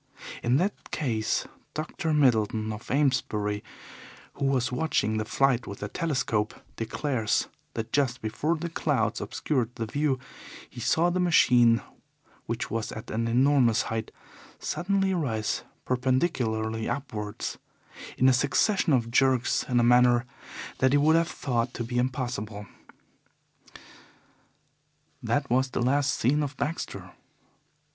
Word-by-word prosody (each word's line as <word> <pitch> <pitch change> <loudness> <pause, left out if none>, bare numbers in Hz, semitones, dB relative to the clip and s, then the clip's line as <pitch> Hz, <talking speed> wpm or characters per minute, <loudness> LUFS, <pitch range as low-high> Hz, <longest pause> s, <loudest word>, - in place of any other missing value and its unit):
In 120 +3 +2
that 190 +6 -2
case, 115 -7 -1 0.3
Dr. 160 +1 -3
Middleton, 110 -6 +2
of 105 - -10
Amesbury, 105 -7 0 0.7
who 140 - -3
was 135 -1 +1
watching 125 -6 0
the 110 - -1
flight 130 +1 +1
with 100 - -7
a 100 - -4
telescope, 135 - -1 0.2
declares 115 -1 -1 0.3
that 115 0 -4
just 130 -3 +1
before 120 +10 -1
the 170 +2 -4
clouds 145 -8 0
obscured 125 +1 -2
the 115 - -3
view 140 +4 0 0.5
he - - -11
saw 160 +8 +2
the 185 - 0
machine, 120 - +5 0.6
which - - -3
was 115 -1 -2
at 110 - -8
an 115 +1 -1
enormous 125 -1 +3
height, 110 -1 -3 0.5
suddenly 195 +1 0
rise 115 -11 -1 0.2
perpendicularly 125 -4 0
upwards 105 -7 -4 0.6
in 130 - +4
a 130 - +6
succession 150 - +2
of 115 -3 +1
jerks 130 -1 +2
in 125 -1 +3
a - - +3
manner 125 0 +5 0.5
that 130 +1 +3
he - - +6
would 155 +3 +4
have 165 0 +2
thought 120 -5 -2
to 120 - -3
be 120 +1 -2
impossible. 120 -5 -3 2.6
That 145 -1 0
was 130 +2 +2
the - - -2
last 140 +3 +2
seen 145 +6 +2
of 145 -1 -4
Baxter. 155 +4 -4
125 Hz, 130 wpm, -27 LUFS, 115-145 Hz, 2.6 s, a